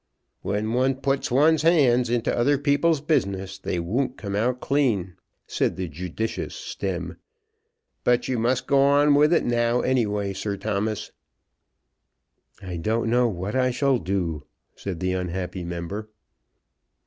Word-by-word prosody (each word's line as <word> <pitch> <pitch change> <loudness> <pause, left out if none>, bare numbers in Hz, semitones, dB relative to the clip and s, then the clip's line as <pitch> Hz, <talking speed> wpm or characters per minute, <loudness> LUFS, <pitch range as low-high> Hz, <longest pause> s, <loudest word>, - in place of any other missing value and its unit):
"When 110 +2 -2
one 130 +2 +2
puts 135 0 -1
one's 150 +5 +4
hand 130 -7 +4
into 120 -1 0
other 140 +4 +3
people's 145 +2 +2
business, 95 - -1
they 90 - -2
won't 125 +10 -1
come 100 -1 -4
out 125 +4 0
clean," 115 -12 0 0.3
said - - -1
the 95 - -3
judicious 90 +8 -4
Stemm. - - -4 0.9
"But 125 0 +2
you 125 -3 -1
must 120 +2 +1
go 140 - +3
on 145 +1 +5
with 150 +2 +5
it 170 - +3
now, 120 0 +1
any 125 -3 +1
way, 100 -1 -2
Sir 100 +1 -3
Thomas." 105 +1 -2 1.5
"I 90 -2 -5
don't 115 +6 0
know 125 0 +4
what 100 -1 -4
I 130 -1 +3
shall 135 0 +1
do," 90 -7 -2 0.3
said 90 -4 -6
the 90 0 0
unhappy 90 0 -3
member. 85 +5 -5
115 Hz, 145 wpm, -24 LUFS, 95-135 Hz, 1.5 s, on